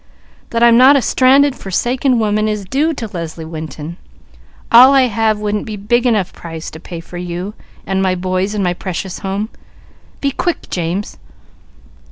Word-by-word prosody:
That 230 0 0
I'm 235 -1 +6
not 265 +3 +7
a 275 - +3
stranded, 270 +1 +4
forsaken 245 +6 0
woman 215 -1 +1
is 210 -2 -2
due 285 - +1
to 245 -7 -5
Leslie 165 -2 -6
Winton; 160 0 -7 0.7
all 255 +4 +9
I 270 - +6
have 225 -2 +1
wouldn't 210 +1 -2
be 215 - -4
big 240 +5 +1
enough 210 -6 0
price 165 -1 -8
to 160 - -10
pay 170 0 -8
for 175 +1 -9
you, 180 +3 -5 0.3
and 190 0 -1
my 185 -1 +1
boys, 185 +3 -2
and 205 - 0
my 180 -1 +1
precious 185 +1 -5
home. 200 +3 -3 0.7
Be 280 - 0
quick 350 +5 -3
James!" 180 +3 -3
205 Hz, 170 wpm, -16 LUFS, 180-240 Hz, 0.7 s, all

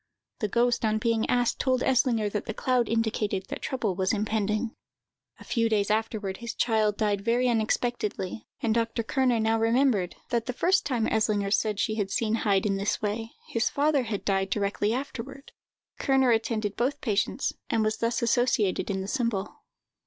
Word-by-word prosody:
The 215 - 0
ghost, 240 +3 +1
on 215 -1 +2
being 225 0 0
asked, 245 -1 +1
told 255 -1 +1
Eslinger 245 -4 +2
that 210 +1 -3
the 220 - -4
cloud 250 -3 +1
indicated 215 -3 0
that - - -5
trouble 235 -7 -1
was 190 +2 0
impending. 215 +1 -1 0.7
A - - -11
few 230 -2 0
days 210 -1 +1
afterward 215 -3 -1
his 235 0 -6
child 215 -3 +1
died 205 -2 0
very 235 +4 +2
unexpectedly, 225 -3 -1
and 225 -2 +1
Dr. 230 0 0
Kerner 250 -1 +1
now 225 0 +2
remembered, 225 -5 +2
that 235 -1 -1
the 250 - -2
first 370 +9 +2
time 240 -5 0
Eslinger 210 -3 +1
said 210 0 +1
she 215 -1 0
had 200 -3 -1
seen 220 +2 0
Heyd 200 -3 +1
in 195 -1 +1
this 200 +1 -1
way, 220 +2 -3 0.2
his 230 0 +1
father 290 0 +2
had 220 -4 -4
died 195 -1 +1
directly 205 +1 0
afterward. 270 +2 -5 0.5
Kerner 265 -2 +3
attended 220 -2 0
both 270 +5 0
patients, 210 +4 0 0.2
and 225 - +2
was 215 0 0
thus 230 +1 -1
associated 235 -6 +1
in 190 -1 -1
the 190 - -5
symbol. 230 -5 -1
225 Hz, 175 wpm, -27 LUFS, 210-240 Hz, 0.7 s, Kerner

